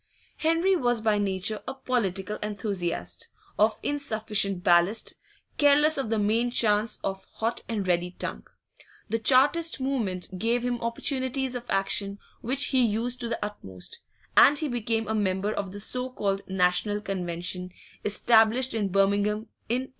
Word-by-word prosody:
Henry 330 +4 +2
was 245 -7 +1
by 215 -1 +1
nature 200 +1 -1
a - - -4
political 210 -6 -2
enthusiast, 200 -4 -3 0.3
of 215 +1 +3
insufficient 215 -9 -1
ballast, 180 +3 +3 0.5
careless 295 +1 +5
of 270 -5 -2
the 225 - +1
main 220 +4 +2
chance, 215 -2 +2
of 195 0 -4
hot 230 +1 -1
and 205 -4 -2
ready 175 0 +1
tongue; - - -5 0.6
the 225 - 0
Chartist 280 +7 +4
movement 200 -9 -2
gave 235 +4 +1
him 245 -1 -2
opportunities 260 +2 -1
of 245 -1 -6
action 195 +1 0 0.2
which 260 +4 +1
he 260 -1 +4
used 235 +3 -1
to 235 - -2
the 230 -2 -2
utmost, 95 - -6 0.4
and 290 - +7
he 305 - -1
became 225 -3 -1
a 220 - -1
member 200 0 0
of 195 -2 -4
the 205 - -8
so 250 +5 -4
called 200 -5 -2
National 190 +2 +1
Convention, 180 -2 -3 0.3
established 225 +4 +3
in 215 -3 0
Birmingham 200 +3 +1 0.2
in 245 +2 +1
1839. - - -18
215 Hz, 150 wpm, -27 LUFS, 195-245 Hz, 0.6 s, and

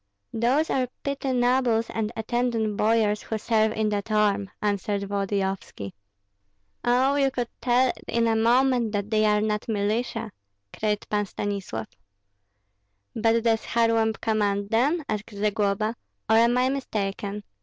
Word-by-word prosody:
"Those 255 +8 +1
are 255 -1 +1 0.2
petty 280 -1 -2
nobles 245 -2 +2
and 220 -1 -2
attendant 225 -1 -1
boyars 215 -1 +2
who 220 - -3
serve 220 0 +2
in 215 -1 0
that 205 +1 -2
arm," 205 -2 +2
answered 205 -1 -1
Volodyovski. 195 - -3 0.9
"Oh, 255 +3 +3
you 275 -1 +3
could 245 -2 -3
tell 250 +1 +3
in 235 0 +1
a 225 -1 +2
moment 240 0 +3
that 205 +1 -2
they 215 0 +3
are 210 0 +3
not 210 0 -1
militia," 220 +2 -1 0.4
cried 210 -1 -1
Pan 205 -1 0
Stanislav. 195 - -4 1.3
"But 225 +1 +2
does 225 -1 +2
Kharlamp 230 -1 +1
command 205 -2 0
them," 285 +9 +2
asked 215 +1 -3
Zagloba, 210 +1 0 0.3
"or 220 - +4
am 235 +2 +4
I 255 +1 +3
mistaken? 205 -6 -3
220 Hz, 135 wpm, -25 LUFS, 205-240 Hz, 1.3 s, or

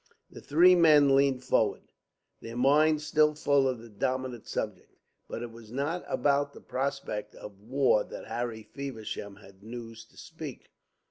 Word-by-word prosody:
The - - -11
three 175 +5 +5
men 150 -5 +6
leaned 135 -2 +2
forward, 125 - 0 0.5
their 115 +1 -8
minds 150 +4 +3
still 150 -1 +3
full 140 -2 +2
of 130 -1 -1
the 115 +1 -12
dominant 125 +2 -3
subject. - - -5 0.3
But 115 - -5
it 120 - -7
was 115 -1 -13
not 145 +7 -2
about 145 0 +1
the - - -12
prospect 135 -5 -4
of 100 -1 -11
war 125 -2 +2
that - - -9
Harry 120 -2 -4
Feversham 110 -5 -7
had 95 0 -17
news 115 0 -9
to - - -26
speak. - - -9
130 Hz, 155 wpm, -29 LUFS, 115-145 Hz, 0.5 s, men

